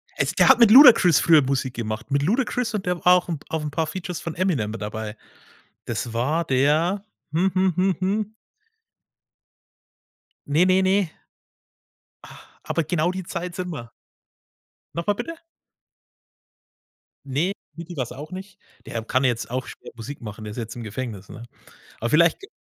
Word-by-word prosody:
Äh, -, -, +1 dB
der -, -, +6 dB
hat 255 Hz, -2 st, +7 dB
mit 225 Hz, -3 st, +7 dB
Ludacris 235 Hz, -, +8 dB
früher 160 Hz, -3 st, +6 dB
Musik 130 Hz, -2 st, -1 dB
gemacht, 110 Hz, 0 st, -5 dB
mit 140 Hz, 0 st, +2 dB
Ludacris 245 Hz, -, 0 dB
und 200 Hz, -3 st, -3 dB
der 180 Hz, 0 st, 0 dB
war 180 Hz, -, +8 dB
auch 180 Hz, 0 st, +2 dB
'n 160 Hz, -4 st, -3 dB
auf 160 Hz, -1 st, -2 dB
'n 150 Hz, -, -4 dB
paar 160 Hz, +1 st, -1 dB
Features 180 Hz, -1 st, -5 dB
von 165 Hz, -, -5 dB
Eminem 160 Hz, -, 0 dB
mit 110 Hz, -1 st, -7 dB
dabei. 105 Hz, +1 st, -5 dB, 0.7 s
Das 115 Hz, -, -4 dB
war 145 Hz, +9 st, 0 dB
der 155 Hz, +9 st, +1 dB, 0.3 s
hm, 180 Hz, +4 st, +1 dB
hm, 185 Hz, -1 st, +2 dB
hm, 185 Hz, 0 st, +2 dB
hm. 205 Hz, +3 st, -1 dB, 2.1 s
Ne, 150 Hz, +4 st, +3 dB
ne, 185 Hz, +1 st, +4 dB
ne. 195 Hz, +2 st, +3 dB, 1.2 s
Ah, -, -, -16 dB
aber 160 Hz, +1 st, -1 dB
genau 170 Hz, +2 st, 0 dB
die 185 Hz, 0 st, -5 dB
Zeit 175 Hz, +1 st, -5 dB
sind 180 Hz, -1 st, -4 dB
wir. 120 Hz, -6 st, -8 dB, 1.0 s
Noch 170 Hz, +2 st, -4 dB
mal 205 Hz, -, +4 dB
bitte? 330 Hz, +7 st, -6 dB, 1.9 s
Ne, 145 Hz, +8 st, 0 dB, 0.2 s
Diddy 170 Hz, +1 st, -9 dB
war's 125 Hz, -4 st, -3 dB
auch 145 Hz, +6 st, -9 dB
nicht. 190 Hz, +2 st, -9 dB, 0.3 s
Der 115 Hz, -1 st, -5 dB
kann 130 Hz, +4 st, 0 dB
jetzt 120 Hz, -3 st, 0 dB
auch 130 Hz, 0 st, -3 dB
schwer -, -, -11 dB
Musik 120 Hz, +5 st, -8 dB
machen, 110 Hz, -1 st, -8 dB
der 105 Hz, -, -6 dB
ist 105 Hz, -, -10 dB
jetzt 115 Hz, -1 st, -5 dB
im 120 Hz, -, -7 dB
Gefängnis, 105 Hz, -3 st, -6 dB
ne? 115 Hz, -, -10 dB, 0.6 s
Aber 115 Hz, -, -1 dB
vielleicht 170 Hz, +2 st, +4 dB
g 395 Hz, -, -12 dB
160 Hz, 170 wpm, -23 LUFS, 125-185 Hz, 2.1 s, Ludacris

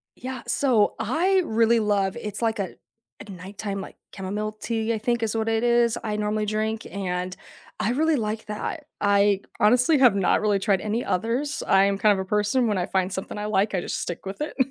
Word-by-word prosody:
Yeah, 255 Hz, 0 st, -6 dB
so, 240 Hz, -7 st, +2 dB
I 345 Hz, -, +2 dB
really 230 Hz, +1 st, +3 dB
love 200 Hz, -2 st, +1 dB
it's 210 Hz, -2 st, -5 dB
like 225 Hz, -2 st, 0 dB
a 190 Hz, -, -3 dB, 0.5 s
a 205 Hz, -, -11 dB
nighttime, 195 Hz, +2 st, -6 dB
like, -, -, -10 dB, 0.2 s
chamomile 210 Hz, +2 st, -3 dB
tea, 225 Hz, 0 st, -1 dB
I -, -, -1 dB
think 235 Hz, +2 st, -1 dB
is 220 Hz, 0 st, -1 dB
what 225 Hz, 0 st, 0 dB
it 225 Hz, 0 st, +1 dB
is, 235 Hz, -1 st, +3 dB
I 210 Hz, -1 st, -1 dB
normally 210 Hz, 0 st, -1 dB
drink 215 Hz, +1 st, -2 dB
and 185 Hz, -1 st, -3 dB, 0.4 s
I 220 Hz, -, 0 dB
really 315 Hz, +4 st, +2 dB
like 220 Hz, -2 st, -3 dB
that. 210 Hz, -1 st, -5 dB, 0.2 s
I, 200 Hz, -1 st, +3 dB, 0.2 s
honestly, 250 Hz, +8 st, +4 dB
have 250 Hz, -7 st, +5 dB
not 195 Hz, -2 st, +2 dB
really 210 Hz, -2 st, +2 dB
tried 195 Hz, -1 st, +2 dB
any 220 Hz, +3 st, -2 dB
others. 240 Hz, +10 st, -1 dB
I 195 Hz, 0 st, +5 dB
am 200 Hz, 0 st, +1 dB
kind 210 Hz, +1 st, +4 dB
of 195 Hz, -, -2 dB
a 190 Hz, -, -3 dB
person 210 Hz, +5 st, +1 dB
when 210 Hz, -, 0 dB
I 180 Hz, -, 0 dB
find 190 Hz, 0 st, 0 dB
something 190 Hz, +2 st, -5 dB
I 210 Hz, -, -4 dB
like, 205 Hz, -1 st, +1 dB
I 180 Hz, -, 0 dB
just -, -, -3 dB
stick 175 Hz, -, -5 dB
with 195 Hz, +1 st, -6 dB
it. 300 Hz, -, -3 dB
210 Hz, 210 wpm, -25 LUFS, 200-230 Hz, 0.5 s, have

